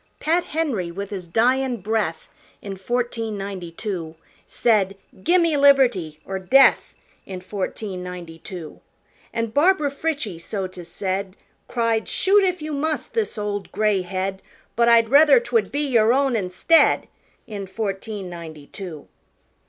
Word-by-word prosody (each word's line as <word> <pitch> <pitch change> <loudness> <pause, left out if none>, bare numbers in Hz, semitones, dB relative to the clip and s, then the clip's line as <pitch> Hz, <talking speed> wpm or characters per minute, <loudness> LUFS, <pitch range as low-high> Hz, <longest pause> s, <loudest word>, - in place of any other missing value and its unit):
Pat 340 +3 +1
Henry, 275 - -2
with 200 +4 -6
his 185 -3 -5
dyin' 250 +6 +2
breath 200 -5 -2 0.3
In 195 -1 -7
fourteen 230 +1 -2
ninety 195 -3 -6
two 170 -4 -5 0.3
Said, 200 -4 +1 0.2
"Gimme 335 - +3
liberty 245 - +4
or 190 0 -4
death!" 265 +9 +4 0.3
In 185 -1 -6
fourteen 190 0 -5
ninety 175 -2 -8
two. 170 -4 -9 0.5
An' 230 -1 -2
Barbara 305 +1 +3
Frietchie, 280 - -3
so 195 +2 -3
'tis 180 -2 -9
said, 190 0 -3 0.3
Cried, 230 -2 0
"Shoot 400 +1 +3
if 365 -4 0
you 305 0 -4
must 310 +2 -2
this 445 - -1
old, 205 -1 -4
gray 210 -3 +1
head, 190 +1 -3 0.3
But 235 0 +4
I'd 230 -1 +5
rather 285 -1 +7
'twould 235 -4 0
be 285 - -1
your 235 -4 +4
own 270 -2 +2
instead!" 195 - +3 0.4
In 200 -3 -6
fourteen 195 0 -4
ninety 165 -4 -9
two. 170 -3 -9
210 Hz, 140 wpm, -22 LUFS, 185-265 Hz, 0.5 s, rather